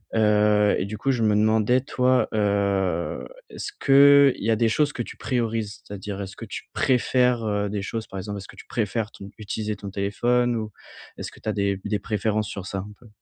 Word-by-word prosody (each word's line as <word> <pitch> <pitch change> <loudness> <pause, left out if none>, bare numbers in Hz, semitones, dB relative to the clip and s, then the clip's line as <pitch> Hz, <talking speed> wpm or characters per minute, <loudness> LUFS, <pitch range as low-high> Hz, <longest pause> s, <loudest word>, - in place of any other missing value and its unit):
Heu 105 -1 +4
et - - -1
du 105 +2 -6
coup 135 - +1
je 120 -3 0
me 105 -1 +3
demandais 110 +3 +3
toi, 130 -1 +2
heu, 100 -4 0 0.2
est-ce 415 - -6
qu'il 140 -2 +6
y 115 - +2
a 110 - +4
des 115 +1 +2
choses 145 +6 +1
que - - -4
tu - - -11
priorises? 115 -5 -2
C'est-à-dire, 100 0 -6
est-ce 95 0 -7
que - - -7
tu - - -7
préfères, 125 -1 +2
heu, 105 -1 0
des 100 -1 -3
choses, 110 +3 -4
par 95 - -6
exemple, 100 +2 -5
est-ce 95 - -10
que - - -14
tu - - -12
préfères 110 0 -2
ton 100 - -11
utiliser 105 0 -3
ton 100 - -7
téléphone? 120 +5 +1
Ou, 110 -1 -4 0.5
est-ce - - -6
que - - -16
tu - - -3
as - - 0
des 100 -1 -1
des 105 0 -1
préférences 105 -1 -1
sur 95 -2 -6
ça, 100 - -3
un 100 +2 -7
peu? 120 - -17
105 Hz, 220 wpm, -24 LUFS, 100-120 Hz, 0.5 s, qu'il